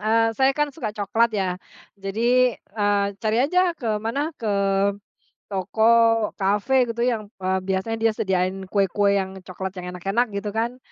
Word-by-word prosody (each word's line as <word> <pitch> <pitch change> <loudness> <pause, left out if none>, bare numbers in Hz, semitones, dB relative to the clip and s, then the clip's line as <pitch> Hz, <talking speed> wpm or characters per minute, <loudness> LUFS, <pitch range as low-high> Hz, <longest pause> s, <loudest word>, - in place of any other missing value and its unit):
eee, 225 +2 +3
saya 265 +4 +3
kan, 295 -1 0
suka 260 -6 -4
coklat, 225 +3 +2
ya, 190 -2 0 0.5
jadi, 235 +5 +2
eee, 205 -1 0
cari 220 -1 0
aja 360 +6 +2 0.2
ke 220 -6 -2
mana, 280 +9 -2
ke 225 - -2 1.0
toko, 200 +2 -3 0.5
kafe, 210 +7 +2
gitu. 235 - -6
Yang, 225 -4 -1
eee, 190 0 0
biasanya 190 +4 -1
dia 225 - +4
sediain 190 -1 -1
kue-kue 200 0 +2
yang 190 -1 -3
coklat, 185 +1 -6
yang 180 - -7
enak-enak, 200 +7 0
gitu 205 +1 -3
kan. 230 +3 -1
210 Hz, 155 wpm, -23 LUFS, 195-235 Hz, 1.0 s, dia